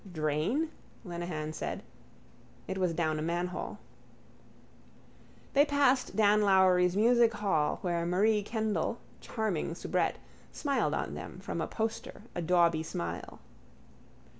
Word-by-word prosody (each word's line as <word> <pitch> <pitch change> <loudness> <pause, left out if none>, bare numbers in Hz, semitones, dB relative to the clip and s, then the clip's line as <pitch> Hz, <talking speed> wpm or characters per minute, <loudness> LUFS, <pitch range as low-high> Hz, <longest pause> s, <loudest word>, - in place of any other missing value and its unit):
—Drain? 160 - 0 0.4
Lenehan 170 -3 -4
said. 155 - -4 0.8
It 190 - -3
was 180 -2 +2
down 160 -2 0
a - - -2
manhole. 175 +3 -3 1.8
They 280 - +6
passed 285 -3 +2
Dan 210 -1 +4
Lowry's 185 -2 +4
musichall 215 -8 +3
where 170 -2 0
Marie 210 +4 +3
Kendall, 220 -1 -1 0.2
charming 200 -7 -2
soubrette, - - 0 0.3
smiled 280 -2 0
on - - -3
them - - -8
from - - -4
a - - -1
poster 220 -2 -4
a 175 - -3
dauby 170 -1 +3
smile. 85 - -5
185 Hz, 115 wpm, -31 LUFS, 170-220 Hz, 1.8 s, They